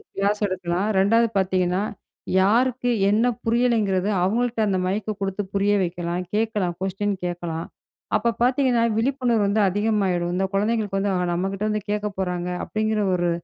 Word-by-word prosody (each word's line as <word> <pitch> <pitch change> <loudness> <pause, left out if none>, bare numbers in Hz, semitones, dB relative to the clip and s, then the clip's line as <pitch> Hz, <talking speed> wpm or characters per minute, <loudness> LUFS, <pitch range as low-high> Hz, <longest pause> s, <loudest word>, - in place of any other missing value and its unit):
Class 205 +2 0
எடுக்கலாம். 185 +1 -2
2வது 230 +4 +4
பார்த்தீங்கன்னா 185 0 +1 0.6
யாருக்கு 245 +5 +2 0.2
என்ன 220 +4 +3 0.2
புரியலைங்கிறத 225 -5 +1 0.2
அவங்கள்ட்ட 230 +4 0
அந்த 190 -2 +1
மைக்க 210 +3 -1
குடுத்து 195 +1 -2
புரிய 200 +1 +2
வைக்கலாம். 175 0 -2
கேக்கலாம் 210 -6 0
கொஸ்டின் 195 +1 -1
கேக்கலாம். 170 -2 -4 0.5
அப்ப 235 +2 +1
பார்த்தீங்கன்னா, 250 -2 +3
விழிப்புணர்வு 240 -3 +1
வந்து 205 +2 +2
அதிகமாயிரும். 195 -4 0
இந்த 190 +1 +1
குழந்தைகளுக்கு 210 -1 0
வந்து, 200 0 0
ஆ - - +1 0.2
நம்ம 185 +3 -1
கிட்ட 195 +2 -4
வந்து 210 0 -1
கேக்க 210 0 -1
போறாங்க 180 -1 -2
அப்டிங்கிற 215 0 -1
ஒரு, 175 -1 +1
205 Hz, 145 wpm, -23 LUFS, 185-225 Hz, 0.6 s, 2வது